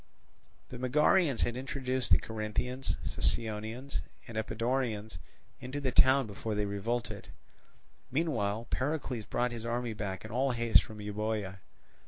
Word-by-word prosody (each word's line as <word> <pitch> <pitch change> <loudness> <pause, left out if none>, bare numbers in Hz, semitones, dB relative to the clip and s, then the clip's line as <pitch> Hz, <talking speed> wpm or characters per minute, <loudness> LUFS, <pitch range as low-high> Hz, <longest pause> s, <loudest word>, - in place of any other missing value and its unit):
The 125 - -7
Megarians 145 +2 +4
had 120 - +1
introduced 130 -1 0
the - - +8
Corinthians, 115 +4 -2
Sicyonians, 110 +5 -1 0.3
and 115 - -8
Epidaurians 110 -3 -1 0.4
into 130 +3 -4
the 135 -3 0
town 130 +1 +6
before 105 +1 -4
they 105 0 +1
revolted. 105 +1 -2 0.8
Meanwhile 115 -8 0
Pericles 130 -5 -1
brought 120 +3 0
his 115 -2 -5
army 120 0 -1
back 100 -2 -4
in 110 - -8
all 130 +3 +2
haste 115 -1 +5
from 110 -1 -9
Euboea. 105 -1 -2
115 Hz, 130 wpm, -32 LUFS, 110-130 Hz, 0.8 s, the